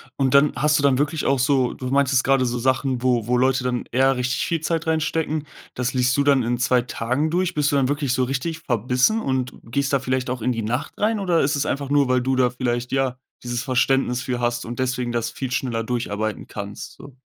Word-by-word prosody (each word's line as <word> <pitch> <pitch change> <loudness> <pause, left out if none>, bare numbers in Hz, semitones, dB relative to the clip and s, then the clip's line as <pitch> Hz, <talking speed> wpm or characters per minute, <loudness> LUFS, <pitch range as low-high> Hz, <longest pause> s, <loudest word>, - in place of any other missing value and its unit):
Und 135 -1 +1
dann 140 +2 +5
hast 150 0 +2
du - - -2
dann 135 -2 +4
wirklich 150 +1 -1
auch 135 0 +2
so 130 -1 +2
du 130 - -6
meintest 135 -1 +2
grade 135 -1 +3
so 120 0 -1
Sachen, 130 0 0
wo 120 -3 +1
wo 125 0 +2
Leute 130 0 +2
dann 125 -1 -1
eher 135 +2 +3
richtig 125 +2 -1
viel 165 -2 -1
Zeit 165 0 -2
reinstecken, 160 -1 -1 0.3
das 125 +1 -2
liest 125 0 +2
du 140 - +2
dann 140 -3 +3
in 120 +1 0
2 125 0 +3
Tagen 130 +6 -1
durch. 180 +2 0
Bist 145 -1 +1
du - - +3
dann 135 -1 +2
wirklich 145 -3 0
so 130 - +1
richtig 140 +6 -2
verbissen 125 - +1
und 130 - -1
gehst 135 +5 -2
da 140 - +3
vielleicht 130 -1 -2
auch 125 -2 -3
in 125 +2 0
die 115 - -3
Nacht 120 +6 -3
rein 215 +1 +1
oder 180 -4 +2
ist 145 +1 +1
es 140 - 0
einfach 140 0 -2
nur, 145 -2 +3
weil 130 -1 +2
du 130 +1 0
da 125 -1 +3
vielleicht, 125 0 -2
ja, 135 -2 0 0.3
dieses 120 0 -3
Verständnis 130 -1 +1
für 125 0 -3
hast 120 0 -1
und 120 +3 -7
deswegen 125 -1 -1
das 115 -1 -1
viel 130 +1 -5
schneller 120 -3 -1
durcharbeiten 110 -3 -3
kannst, 100 0 -7
so? 135 -2 -14
130 Hz, 235 wpm, -22 LUFS, 125-140 Hz, 0.3 s, dann